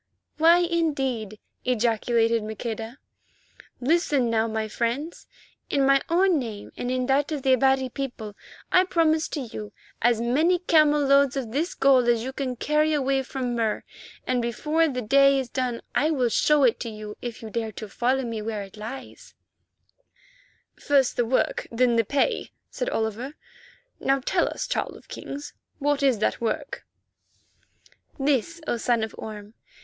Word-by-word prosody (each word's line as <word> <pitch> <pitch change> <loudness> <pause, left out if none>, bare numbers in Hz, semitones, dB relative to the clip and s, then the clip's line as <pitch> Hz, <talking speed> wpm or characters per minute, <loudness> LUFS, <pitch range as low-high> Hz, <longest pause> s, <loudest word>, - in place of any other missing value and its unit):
"Why, 335 +2 +7
indeed?" 270 - -1 0.3
ejaculated 230 -1 +1
Maqueda. 225 +3 -5 0.8
"Listen, 275 -3 +2
now, 225 0 +2
my 220 -1 -2
friends. 240 +9 -3 0.4
In 275 -1 +2
my 275 0 +4
own 355 -1 +3
name 220 -5 -6
and 245 - -4
in 255 0 0
that 275 +3 +1
of 290 -4 -3
the 265 - +4
Abati 265 +1 +3
people 245 -6 -6 0.4
I 365 - +6
promised 325 -3 +1
to 295 - -2
you 215 -4 -7 0.3
as 235 -1 +3
many 295 +10 +2
camel 305 -4 +4
loads 275 -1 +4
of 245 -5 -4
this 320 +8 -1
gold 260 -3 +4
as 235 -1 +2
you 265 +2 -5
can 260 -2 -3
carry 300 +4 +1
away 270 -2 +1
from 260 -2 -3
Mur, 225 -2 -1 0.4
and 255 -1 0
before 300 +8 +1
the 250 -4 -3
day 275 +4 +5
is 260 -2 -2
done 250 -2 -2
I 305 - +2
will 260 -6 +1
show 295 +5 +3
it 240 -3 +3
to 235 - -4
you 215 -1 -8
if 235 -2 -6
you 220 - -7
dare 225 -1 -2
follow 240 +5 -1
me 230 -2 -4
to - - -6
where 215 -2 -3
it 195 +2 -13
lies 230 +6 -9 1.4
hid." - - -21
"First 275 -3 +3
the 240 - +1
work, 255 - 0
then 240 0 +2
the 230 - +3
pay," 285 - 0 0.2
said - - -2
Oliver. 225 - -3 0.6
"Now 270 0 +2
tell 260 - +1
us, - - -4
Child - - -2
of - - -19
Kings, 285 +1 -7 0.2
what 290 0 0
is 270 -4 +3
that 215 - -1
work?" 230 - -3 1.3
"This, 285 +4 0
O 240 - -1
Son 235 -1 +1
of 220 - -4
Orme. 210 -1 -8
255 Hz, 165 wpm, -25 LUFS, 230-285 Hz, 1.4 s, Why